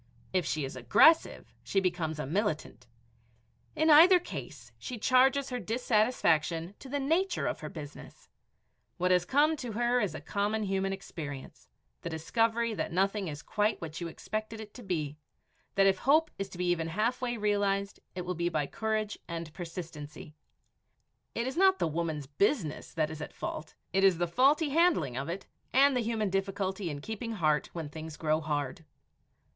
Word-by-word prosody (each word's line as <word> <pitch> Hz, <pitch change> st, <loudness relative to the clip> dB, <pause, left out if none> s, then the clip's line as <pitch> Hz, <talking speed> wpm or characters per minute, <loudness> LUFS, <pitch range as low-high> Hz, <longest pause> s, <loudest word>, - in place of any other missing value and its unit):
If 185 Hz, -4 st, +1 dB
she 155 Hz, -3 st, -1 dB
is 135 Hz, -, -7 dB
aggressive, 130 Hz, -, +4 dB
she 195 Hz, -, +1 dB
becomes 175 Hz, -4 st, -1 dB
a 150 Hz, -, -3 dB
militant. 155 Hz, -, -2 dB, 0.9 s
In 315 Hz, 0 st, +4 dB
either 340 Hz, +5 st, +9 dB
case, 355 Hz, -, -8 dB
she 250 Hz, -, -6 dB
charges 265 Hz, +4 st, +3 dB
her 250 Hz, -, -2 dB
dissatisfaction 210 Hz, -8 st, +1 dB
to 270 Hz, -, -10 dB
the 285 Hz, +2 st, -1 dB
nature 340 Hz, +7 st, +1 dB
of 205 Hz, -, -2 dB
her 155 Hz, -, -6 dB
business. 150 Hz, -3 st, -10 dB, 0.7 s
What 180 Hz, +1 st, +1 dB
has 180 Hz, -1 st, +4 dB
come 295 Hz, -, +3 dB
to 245 Hz, -5 st, -5 dB
her 240 Hz, +2 st, +2 dB
is 185 Hz, -7 st, -1 dB
a -, -, -5 dB
common 205 Hz, +7 st, -1 dB
human 195 Hz, -1 st, 0 dB
experience, 155 Hz, -8 st, -7 dB, 0.3 s
the 170 Hz, -, -4 dB
discovery 225 Hz, +8 st, 0 dB
that 200 Hz, -, -3 dB
nothing 195 Hz, +2 st, +1 dB
is 150 Hz, -1 st, -6 dB
quite 210 Hz, +1 st, 0 dB
what 160 Hz, 0 st, -6 dB
you 170 Hz, -, -2 dB
expected 215 Hz, +6 st, -5 dB
it 210 Hz, -1 st, -9 dB
to 250 Hz, -, -10 dB
be, 155 Hz, -8 st, -3 dB, 0.6 s
that 195 Hz, 0 st, +5 dB
if 195 Hz, -1 st, +3 dB
hope 310 Hz, +5 st, +3 dB
is 195 Hz, 0 st, -3 dB
to 185 Hz, -, -10 dB
be 180 Hz, -, -1 dB
even 165 Hz, -2 st, 0 dB
halfway 240 Hz, +7 st, -1 dB
realized, 200 Hz, -1 st, 0 dB, 0.2 s
it 180 Hz, -, -3 dB
will 180 Hz, -, -2 dB
be 170 Hz, 0 st, -1 dB
by 150 Hz, -4 st, 0 dB
courage 215 Hz, +4 st, -2 dB
and 165 Hz, -2 st, -5 dB
persistency. 165 Hz, -4 st, -8 dB, 1.0 s
It 235 Hz, -, -1 dB
is 260 Hz, +1 st, -3 dB
not 380 Hz, +1 st, +5 dB
the -, -, +1 dB
woman's 160 Hz, -2 st, -2 dB
business 160 Hz, -, 0 dB
that 155 Hz, -2 st, 0 dB
is 155 Hz, -1 st, -7 dB
at -, -, -7 dB
fault; 155 Hz, -, -5 dB, 0.2 s
it 195 Hz, 0 st, +3 dB
is 190 Hz, -3 st, +5 dB
the 175 Hz, -, +1 dB
faulty 275 Hz, -, +3 dB
handling 290 Hz, -, +3 dB
of 135 Hz, +5 st, -3 dB
it 180 Hz, +3 st, -4 dB, 0.3 s
and 275 Hz, +1 st, +5 dB
the -, -, +2 dB
human 220 Hz, -3 st, -1 dB
difficulty 195 Hz, -1 st, -1 dB
in 145 Hz, -2 st, -5 dB
keeping 220 Hz, +5 st, -5 dB
heart 155 Hz, -7 st, +1 dB
when 165 Hz, -3 st, -4 dB
things 160 Hz, 0 st, -8 dB
grow 155 Hz, 0 st, +1 dB
hard. 145 Hz, -1 st, -3 dB
195 Hz, 175 wpm, -30 LUFS, 160-230 Hz, 1.0 s, either